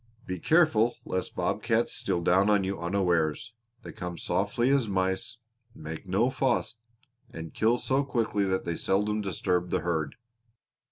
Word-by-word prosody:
Be 90 Hz, -1 st, -4 dB
careful 120 Hz, -, +3 dB
lest 95 Hz, -, -3 dB
bob -, -, -1 dB
cats -, -, +1 dB
steal 85 Hz, -, 0 dB
down 95 Hz, +4 st, +4 dB
on 105 Hz, -2 st, +3 dB
you 95 Hz, -1 st, -3 dB
unawares; 85 Hz, +2 st, 0 dB, 0.3 s
they -, -, -8 dB
come 90 Hz, -1 st, -6 dB
softly 105 Hz, -, 0 dB
as 135 Hz, -5 st, +2 dB
mice, 95 Hz, +3 st, -1 dB, 0.4 s
make 80 Hz, +4 st, -8 dB
no 105 Hz, +8 st, +2 dB
fuss, 130 Hz, -3 st, 0 dB, 0.5 s
and 80 Hz, -1 st, -8 dB
kill 115 Hz, +2 st, +2 dB
so 135 Hz, +3 st, +1 dB
quickly 115 Hz, -6 st, 0 dB
that 95 Hz, -1 st, -1 dB
they 85 Hz, -1 st, -2 dB
seldom 105 Hz, +2 st, 0 dB
disturb 90 Hz, -2 st, -1 dB
the -, -, 0 dB
herd. 80 Hz, -3 st, -2 dB
95 Hz, 155 wpm, -28 LUFS, 90-115 Hz, 0.5 s, down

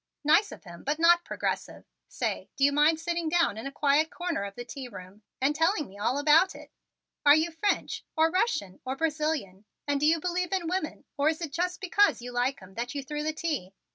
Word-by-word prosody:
Nice 380 Hz, +8 st, +4 dB
of -, -, -11 dB
him 175 Hz, -3 st, -12 dB
but 295 Hz, +2 st, -1 dB
not 345 Hz, +1 st, +5 dB
progressive. -, -, -4 dB, 0.2 s
Say, -, -, -3 dB
do 275 Hz, -, -1 dB
you 285 Hz, -, +6 dB
mind 300 Hz, +3 st, +4 dB
sitting 340 Hz, 0 st, -2 dB
down 335 Hz, -9 st, +2 dB
in 225 Hz, +5 st, -5 dB
a -, -, -6 dB
quiet 290 Hz, +2 st, +2 dB
corner 350 Hz, -, -3 dB
of 200 Hz, 0 st, -8 dB
the 240 Hz, -, -7 dB
tea 260 Hz, +1 st, -7 dB
room 195 Hz, -2 st, -11 dB, 0.2 s
and 280 Hz, +3 st, +1 dB
telling 325 Hz, -1 st, +1 dB
me 190 Hz, -, -15 dB
all 245 Hz, +6 st, 0 dB
about 305 Hz, +6 st, +4 dB
it? -, -, -12 dB, 0.5 s
Are 290 Hz, 0 st, +8 dB
you 320 Hz, +2 st, +1 dB
French 365 Hz, +6 st, -1 dB
or 320 Hz, +1 st, +3 dB
Russian 300 Hz, -, 0 dB
or 260 Hz, +1 st, -3 dB
Brazilian, 300 Hz, -, -2 dB, 0.2 s
and 285 Hz, -1 st, +1 dB
do 300 Hz, -, +3 dB
you 325 Hz, +1 st, +4 dB
believe 360 Hz, +2 st, -2 dB
in 365 Hz, -3 st, -1 dB
women, 360 Hz, -2 st, -3 dB
or 285 Hz, +2 st, +3 dB
is 315 Hz, -, -2 dB
it 330 Hz, -5 st, -5 dB
just 360 Hz, +4 st, -2 dB
because 405 Hz, +2 st, +3 dB
you 245 Hz, +1 st, -7 dB
like 245 Hz, -1 st, -1 dB
'em 185 Hz, +1 st, -14 dB
that 240 Hz, +6 st, -4 dB
you 280 Hz, -, -3 dB
threw 295 Hz, +2 st, -4 dB
the 310 Hz, +1 st, -1 dB
tea? 295 Hz, -, -4 dB
300 Hz, 225 wpm, -28 LUFS, 260-335 Hz, 0.5 s, Are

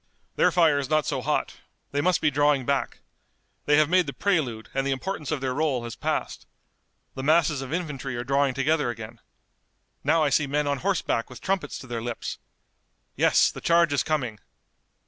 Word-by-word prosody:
"Their -, -, +4 dB
fire 160 Hz, -5 st, +3 dB
is 140 Hz, -2 st, -4 dB
not 155 Hz, -1 st, +2 dB
so -, -, -2 dB
hot. -, -, -1 dB, 0.3 s
They 145 Hz, -, 0 dB
must 180 Hz, +2 st, +2 dB
be 150 Hz, -, +3 dB
drawing 145 Hz, -1 st, +2 dB
back. 140 Hz, +1 st, -1 dB, 0.7 s
They 145 Hz, 0 st, +5 dB
have 155 Hz, -1 st, +5 dB
made 180 Hz, +2 st, +3 dB
the -, -, -4 dB
prelude, 140 Hz, -, -1 dB
and 135 Hz, -, 0 dB
the 140 Hz, -, -2 dB
importance 150 Hz, +2 st, -3 dB
of 155 Hz, -4 st, -2 dB
their 130 Hz, -1 st, -1 dB
role 140 Hz, -4 st, 0 dB
has 120 Hz, -1 st, -6 dB
passed. -, -, -3 dB, 0.7 s
The 130 Hz, -, -6 dB
masses 150 Hz, -1 st, +3 dB
of 135 Hz, 0 st, -7 dB
infantry 150 Hz, -6 st, -3 dB
are 120 Hz, -, -3 dB
drawing 135 Hz, +1 st, +1 dB
together 150 Hz, 0 st, +1 dB
again. 115 Hz, 0 st, -7 dB, 0.8 s
Now 155 Hz, +3 st, +3 dB
I 145 Hz, -, +2 dB
see 145 Hz, 0 st, +2 dB
men 145 Hz, +2 st, 0 dB
on 140 Hz, -1 st, -1 dB
horseback 180 Hz, -10 st, -1 dB
with 125 Hz, -, -10 dB
trumpets 190 Hz, -6 st, -2 dB
to -, -, -10 dB
their 120 Hz, -2 st, -4 dB
lips. 120 Hz, 0 st, -5 dB, 0.8 s
Yes, -, -, +4 dB
the -, -, -9 dB
charge 170 Hz, -2 st, +3 dB
is 140 Hz, -, +2 dB
coming. 125 Hz, -9 st, -2 dB
145 Hz, 190 wpm, -25 LUFS, 130-155 Hz, 0.8 s, They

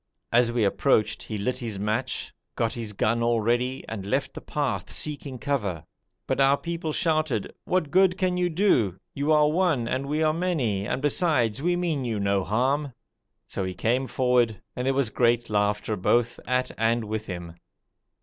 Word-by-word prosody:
As 120 Hz, 0 st, +4 dB
we 120 Hz, -2 st, +1 dB
approached 105 Hz, +2 st, +2 dB
he 110 Hz, -, -5 dB
lit 125 Hz, +5 st, -2 dB
his 115 Hz, -5 st, -4 dB
match, 110 Hz, +5 st, -2 dB, 0.2 s
got 115 Hz, -1 st, 0 dB
his 115 Hz, -3 st, -4 dB
gun 115 Hz, +3 st, 0 dB
all 115 Hz, 0 st, +2 dB
ready, 120 Hz, +4 st, 0 dB
and 110 Hz, -3 st, -5 dB
left 100 Hz, -, -1 dB
the -, -, -8 dB
path -, -, -2 dB
seeking 145 Hz, -3 st, -2 dB
cover, 105 Hz, -, -2 dB, 0.4 s
but -, -, 0 dB
our 135 Hz, +1 st, +5 dB
people 170 Hz, -1 st, -4 dB
shouted: 155 Hz, -, 0 dB
'What 175 Hz, -6 st, 0 dB
good 185 Hz, 0 st, +4 dB
can 185 Hz, -2 st, +1 dB
you 180 Hz, 0 st, +1 dB
do? 155 Hz, -, +2 dB, 0.2 s
You 145 Hz, +2 st, 0 dB
are 150 Hz, -1 st, +5 dB
one 160 Hz, -9 st, +1 dB
and 130 Hz, +3 st, -2 dB
we 155 Hz, +2 st, 0 dB
are 155 Hz, 0 st, +3 dB
many, 135 Hz, -, -1 dB
and 135 Hz, -, -2 dB
besides 140 Hz, -, +1 dB
we 175 Hz, +3 st, +2 dB
mean 170 Hz, -6 st, -1 dB
you 115 Hz, -4 st, -2 dB
no 100 Hz, -1 st, +1 dB
harm!' 130 Hz, +7 st, 0 dB, 0.5 s
so 95 Hz, -, -4 dB
he 95 Hz, -1 st, -4 dB
came 125 Hz, +7 st, 0 dB
forward, 120 Hz, -3 st, +2 dB, 0.2 s
and 125 Hz, +1 st, -2 dB
there 135 Hz, -, +2 dB
was 135 Hz, -5 st, +1 dB
great 120 Hz, 0 st, +2 dB
laughter 105 Hz, +1 st, +1 dB
both 120 Hz, +5 st, +1 dB
at 125 Hz, +1 st, 0 dB
and 115 Hz, +1 st, +2 dB
with 110 Hz, +1 st, -4 dB
him. 85 Hz, -2 st, -6 dB
125 Hz, 180 wpm, -26 LUFS, 110-150 Hz, 0.5 s, our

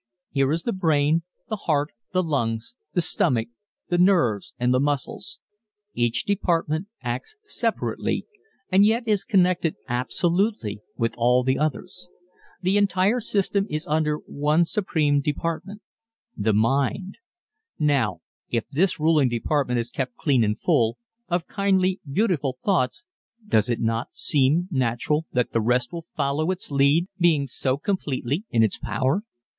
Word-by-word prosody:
Here 135 Hz, 0 st, +2 dB
is 165 Hz, +2 st, -1 dB
the 235 Hz, -, -1 dB
brain, 160 Hz, -3 st, +2 dB, 0.3 s
the 215 Hz, -, -2 dB
heart, 150 Hz, 0 st, +2 dB, 0.2 s
the 185 Hz, 0 st, +1 dB
lungs, 115 Hz, -, -2 dB, 0.2 s
the 175 Hz, -, +3 dB
stomach, 115 Hz, -7 st, +1 dB, 0.4 s
the 175 Hz, -1 st, +1 dB
nerves 170 Hz, -, +2 dB
and 125 Hz, +1 st, +2 dB
the 125 Hz, -, +3 dB
muscles. 145 Hz, -, -2 dB, 0.5 s
Each 120 Hz, -1 st, 0 dB
department 170 Hz, -3 st, 0 dB, 0.2 s
acts 125 Hz, -, -4 dB
separately 420 Hz, -, -2 dB, 0.5 s
and 190 Hz, +2 st, +6 dB
yet 230 Hz, +3 st, +2 dB
is 210 Hz, -3 st, +2 dB
connected 180 Hz, -5 st, +2 dB
absolutely 130 Hz, -, 0 dB, 0.2 s
with 115 Hz, 0 st, 0 dB
all 125 Hz, +2 st, +4 dB
the 130 Hz, +1 st, +1 dB
others. 155 Hz, +4 st, -3 dB, 0.5 s
The 190 Hz, +3 st, +2 dB
entire 200 Hz, +3 st, +2 dB
system 200 Hz, -2 st, 0 dB
is 155 Hz, +1 st, -2 dB
under 150 Hz, 0 st, +1 dB
one 150 Hz, +3 st, +1 dB
supreme 155 Hz, -7 st, +1 dB
department... 165 Hz, +8 st, -3 dB, 0.5 s
the 110 Hz, +2 st, +1 dB
mind. 135 Hz, -, 0 dB, 0.6 s
Now 135 Hz, -, +1 dB, 0.3 s
if 115 Hz, -2 st, -1 dB
this 170 Hz, +6 st, +1 dB
ruling 155 Hz, -4 st, +3 dB
department 125 Hz, +1 st, 0 dB
is 120 Hz, +1 st, -3 dB
kept 130 Hz, -3 st, -3 dB
clean 135 Hz, -6 st, +2 dB
and 105 Hz, 0 st, 0 dB
full, 115 Hz, -1 st, +2 dB, 0.3 s
of 175 Hz, -1 st, -1 dB
kindly, 190 Hz, -2 st, +1 dB
beautiful 150 Hz, -, 0 dB
thoughts 185 Hz, -, +1 dB, 0.4 s
does 110 Hz, -, +2 dB
it 120 Hz, -, 0 dB
not 115 Hz, +1 st, -2 dB
seem 150 Hz, +5 st, +3 dB
natural 130 Hz, +4 st, 0 dB
that 125 Hz, -1 st, +1 dB
the 115 Hz, -, +1 dB
rest 125 Hz, +4 st, +1 dB
will 165 Hz, -2 st, -6 dB
follow 145 Hz, +3 st, 0 dB
its 185 Hz, -4 st, -3 dB
lead 140 Hz, +5 st, +3 dB
being 165 Hz, -5 st, +3 dB
so 130 Hz, 0 st, -1 dB
completely 150 Hz, -, -2 dB
in 115 Hz, -1 st, +3 dB
its 110 Hz, -, 0 dB
power? 135 Hz, +9 st, 0 dB
150 Hz, 140 wpm, -24 LUFS, 125-180 Hz, 0.6 s, and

